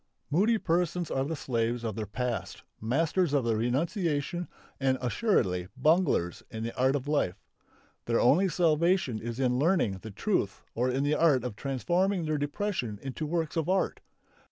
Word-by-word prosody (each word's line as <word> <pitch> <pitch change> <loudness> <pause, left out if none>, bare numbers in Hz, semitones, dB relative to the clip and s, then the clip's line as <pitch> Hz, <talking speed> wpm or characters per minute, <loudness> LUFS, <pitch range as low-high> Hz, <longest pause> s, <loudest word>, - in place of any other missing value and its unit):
Moody 210 +9 +3
persons 175 -2 0
are 135 0 0
the 160 +3 -2
slaves 120 -3 -1
of 110 -3 -3
their 110 -2 -4
past, 125 +3 -3 0.2
masters 155 - +1
of 140 -4 +2
renunciation 145 - 0 0.3
and 135 -1 +2
assuredly 120 - +1
bunglers 155 - +2
in 110 0 -5
the 115 - -4
art 130 +2 +2
of 140 0 -3
life. 145 -12 0 0.7
Their 115 0 +1
only 180 +10 +4
salvation 170 - +2
is 120 +2 -5
in 125 -1 +2
learning 145 - +2
the 110 - -8
truth 100 - -1
or 125 +2 0
in 130 +2 0
the 145 +1 +2
art 150 -5 +3
of 125 -4 -4
transforming 175 - 0
their 155 -1 0
depression 145 - -2
into 135 +3 -4
works 160 -1 -1
of 165 0 -1
art. 190 0 +1
140 Hz, 160 wpm, -29 LUFS, 120-170 Hz, 0.7 s, only